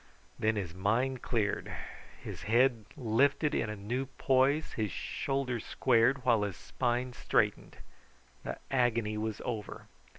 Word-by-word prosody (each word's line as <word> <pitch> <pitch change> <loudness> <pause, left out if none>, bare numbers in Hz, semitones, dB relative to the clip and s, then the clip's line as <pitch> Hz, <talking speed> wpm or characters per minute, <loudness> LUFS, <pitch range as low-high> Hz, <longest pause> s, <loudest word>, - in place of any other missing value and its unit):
Then 110 0 +2
his 95 -6 -3
mind 115 +8 0
cleared. 105 -4 -1 0.5
His - - -7
head 120 -1 +4
lifted 140 +5 +2
in 110 - 0
a 105 - -3
new 120 +7 -3
poise, 135 +3 +2
his 105 -4 -1
shoulders 130 -1 -2
squared, 125 +1 +2
while 115 -4 +4
his 100 -3 -2
spine 125 0 -1
straightened. 105 -4 0 0.7
The - - -4
agony 120 -4 +2
was 110 0 -3
over. 110 -4 -5
120 Hz, 130 wpm, -31 LUFS, 105-130 Hz, 0.7 s, head